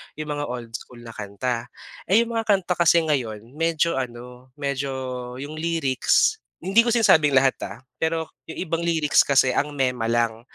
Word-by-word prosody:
yung 155 0 -5
mga 145 0 -3
old 120 -2 -6
school 120 +1 -9
na 115 - -9
kanta. 115 +4 -4 0.4
Eh, 210 +6 +5
yung 235 - -7
mga 225 -1 -2
kanta 180 -2 -1
kasi 170 0 +5
ngayon, 120 -9 -1 0.2
medyo 165 -2 +1
ano 125 0 -8
medyo 140 -1 -2 0.5
yung 150 +2 -7
lyrics 160 -5 +2 0.2
hindi 195 +5 +3
ko 240 - 0
sinabing 185 - +4
lahat, 135 0 +4 0.2
ah, - - -9 0.2
pero 160 0 0 0.2
yung - - -7
ibang 165 -2 -2
lyrics 160 -3 +3
kasi 135 -2 +3
ang 145 0 -1
mema 125 -4 0
lang, 115 -1 0
145 Hz, 170 wpm, -23 LUFS, 125-165 Hz, 0.5 s, Eh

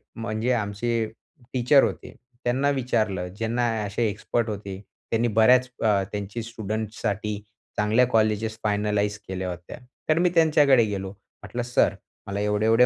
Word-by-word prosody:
म्हणजे 115 +2 -1
आमचे 115 +1 -1 0.5
टीचर 130 +2 +5
होते. 125 - -3 0.3
त्यांना 130 +4 +2
विचारलं 110 -9 0
ज्यांना 115 +2 0 0.2
असे 105 +3 0
एक्सपर्ट 110 +2 -1
होते. 100 -2 -5 0.3
त्यांनी 115 +1 +2
बऱ्याच 125 +3 +6 0.2
अ, 105 -3 +3
त्यांचे 105 +2 -4
स्टुडंट्ससाठी 110 -2 -3 0.4
चांगल्या 110 +4 +4
कॉलेज 110 -2 +2 0.2
फायनलाईज 105 0 0
केल्या 95 0 -3
होत्या. 90 0 -7 0.3
तर 155 +1 +4
मी 180 +1 +4
त्यांच्याकडे 150 -6 +5
गेलो. 95 -2 -4
म्हटलं 110 +4 -8
सर, 120 0 +2 0.3
मला 100 0 -3
एवढे-एवढे 110 +3 +4
110 Hz, 130 wpm, -25 LUFS, 105-120 Hz, 0.5 s, बऱ्याच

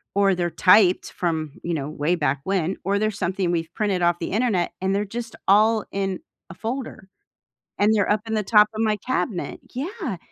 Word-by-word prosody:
or 200 -1 +4
they're 175 -1 -1
typed 185 +1 +4
from, 160 -4 -2
you 170 - -2
know 145 -3 -3
way 155 +3 0
back 145 -4 0
when, 190 -1 -1
or 200 +1 +1
they're 215 +1 +1
something 190 -2 -1
we've 165 -1 -2
printed 205 -4 0
off 175 0 +2
the 170 - -4
internet, 210 -5 0
and 190 +1 +1
they're 205 +1 0
just 230 +2 -6
all 215 +2 +4
in 195 -1 -2 0.3
a - - -8
folder, 225 -1 -5 0.7
and 210 +2 +4
they're 205 -2 +2
up 210 - +2
in 220 - -3
the 215 - 0
top 210 +1 +5
of 215 - -2
my 215 -1 +1
cabinet, 225 -3 -3
yeah 325 - -4
195 Hz, 200 wpm, -23 LUFS, 175-215 Hz, 0.7 s, top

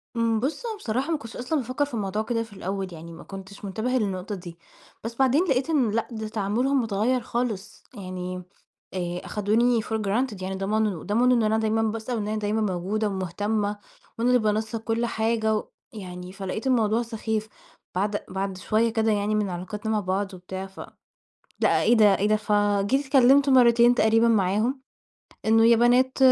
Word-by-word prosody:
إمم، 230 -1 +1
بُص 295 - -3
أنا 450 - -3
بصراحة 260 - -2
ما 320 - +1
كنتش 230 -5 -10
أصلًا 265 +5 -1
بافكر 255 +4 -1
في 280 - -14
الموضوع 210 -1 -1
كده 230 0 -1
في 225 -2 -14
الأول 195 0 -4
يعني، 165 +1 -10
ما 165 - -11
كنتش 195 +1 -10
منتبهة 225 +6 -1
للنقطة 200 -2 -2
دي، 175 -2 -10 0.5
بس 230 +1 -5
بعدين 270 +6 +3
لقيت 260 +3 +1
إن 265 -9 +2
لأ، 230 +1 -1
ده 220 -1 -5
تعاملهم 230 +6 0
متغيّر 225 +4 0
خالص. 225 -4 -4
يعني 185 -1 -6 0.5
آآ 175 -1 -3
أخدوني 225 +3 +2
for 220 - -4
granted 210 0 -1
يعني، 190 +1 -3
ضمنوا 205 -2 -1
ضمنوا 245 +4 +3
إن 225 - +2
أنا 215 +1 +2
دايمًا 220 0 +1
باسأل، 225 +2 -2
وإن 210 -2 -2
أنا 215 0 -2
دايمًا 210 +1 -1
موجودة 205 +2 -1
ومهتمة، 205 +2 -2 0.4
وأنا 240 +2 +2
اللي 250 0 +5
بانسق 220 +1 -1
كل 225 +1 -1
حاجة 220 -1 0
و 210 - -3 0.3
يعني، 180 -3 -8
فلاقيت 195 +5 -4
الموضوع 230 -2 +2
سخيف. 220 -2 -3 0.5
بَعد 205 +2 -1
بَعد 190 0 -3
شوية 220 +5 +1
كده 220 -1 +2
يعني 210 +1 0
من 210 -2 0
علاقاتنا 205 +5 -4
مع 215 - +2
بعض 195 +1 -2
وبتاع، 185 +1 -7
فلأ، 195 0 -11 0.9
إيه 240 - +4
ده، 210 -4 +5
إيه 205 - +1
ده، 215 - +4
فجيت 205 +5 +1
اتكلمت 275 +1 +5
مرتين 240 -2 +6
تقريبًا 225 0 +4
معاهم، 220 +5 +1 0.7
إنّه 225 +1 +5
يا 235 0 +6
بنات، 250 +3 +3
215 Hz, 180 wpm, -25 LUFS, 200-235 Hz, 0.9 s, مرتين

